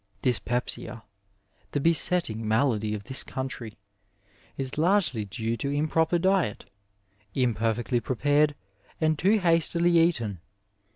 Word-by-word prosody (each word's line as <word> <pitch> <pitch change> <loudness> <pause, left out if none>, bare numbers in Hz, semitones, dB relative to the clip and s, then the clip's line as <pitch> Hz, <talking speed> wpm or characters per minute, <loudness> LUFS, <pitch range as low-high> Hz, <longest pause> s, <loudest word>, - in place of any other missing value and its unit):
Dyspepsia, 120 -2 -2 0.7
the 145 - +1
besetting 160 -7 +1
malady 110 -2 +1
of 100 - -7
Ihis 130 +5 -1
country, 125 -4 -6 0.8
is 135 +2 -2
largely 160 - +2
due 110 +3 -3
to 140 - -3
improper 155 +4 +1
diet, 185 - 0 0.7
imperfectly 120 0 0
pxe 125 +2 -3
pared 145 +2 +3 0.4
and 155 -1 +1
too 205 +4 +4
hastily 170 -1 +3
eaten. 120 - +1
135 Hz, 110 wpm, -26 LUFS, 115-165 Hz, 0.8 s, too